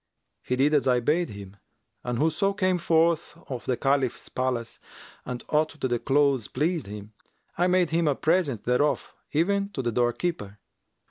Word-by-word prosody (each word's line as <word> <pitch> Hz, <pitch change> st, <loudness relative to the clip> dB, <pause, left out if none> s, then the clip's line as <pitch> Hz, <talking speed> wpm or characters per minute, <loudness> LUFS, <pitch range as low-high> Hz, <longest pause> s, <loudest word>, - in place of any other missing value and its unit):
He 125 Hz, -, -1 dB
did 140 Hz, +4 st, +2 dB
as 145 Hz, -3 st, +3 dB
I 125 Hz, -1 st, +4 dB
bade 160 Hz, +8 st, +1 dB
him, 100 Hz, -1 st, -10 dB, 0.5 s
and 125 Hz, -1 st, -2 dB
whoso 160 Hz, +7 st, +1 dB
came 185 Hz, -3 st, +1 dB
forth 165 Hz, -1 st, +1 dB
of 125 Hz, -3 st, -6 dB
the 125 Hz, -, +1 dB
Caliph's 135 Hz, -1 st, 0 dB
palace 125 Hz, -3 st, -2 dB, 0.5 s
and 125 Hz, -1 st, -5 dB
aught 155 Hz, +1 st, +1 dB
of 135 Hz, -, -2 dB
the 120 Hz, -1 st, 0 dB
clothes 140 Hz, -4 st, +2 dB
pleased 160 Hz, -, -1 dB
him, 105 Hz, +1 st, -9 dB, 0.4 s
I 175 Hz, +1 st, +2 dB
made 180 Hz, -2 st, +2 dB
him 165 Hz, 0 st, +2 dB
a 145 Hz, -, +2 dB
present 155 Hz, -, +1 dB
thereof, 125 Hz, +5 st, 0 dB, 0.2 s
even 200 Hz, +6 st, +1 dB
to 130 Hz, -, -3 dB
the 120 Hz, -, 0 dB
doorkeeper. 120 Hz, -, -1 dB
140 Hz, 170 wpm, -26 LUFS, 120-165 Hz, 0.5 s, I